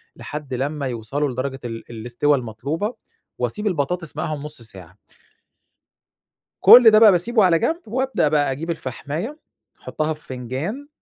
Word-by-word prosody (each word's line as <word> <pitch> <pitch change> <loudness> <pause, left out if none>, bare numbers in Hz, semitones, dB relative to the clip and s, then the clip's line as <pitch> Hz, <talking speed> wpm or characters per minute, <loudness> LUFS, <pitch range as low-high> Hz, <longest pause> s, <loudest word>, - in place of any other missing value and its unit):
لحد 150 -3 -7
لمّا 140 +2 -2
يوصلوا 130 +5 -2
لدرجة 135 +2 -4
ال 115 -1 -6
الاسْتوا 120 +6 0
المطلوبة، 140 - -4 0.4
وأسيب 210 0 -2
البطاطس 170 -1 -2
معاهم 155 -2 -3
نُص 150 -4 -8
ساعة 95 -4 -12 1.6
كُلّ 240 -3 +9
ده 215 - +6
بقى 220 -2 +8
باسيبه 210 +5 +2
على 170 -3 +4
جنب 335 +2 -1
وابدأ 260 - 0
بقى 145 -2 +1
أجيب 155 +6 -5
الفحماية 160 - -5 0.4
أحُطها 155 0 -2
في 155 - -15
فنجان، 135 - -5
150 Hz, 135 wpm, -21 LUFS, 130-185 Hz, 1.6 s, كُلّ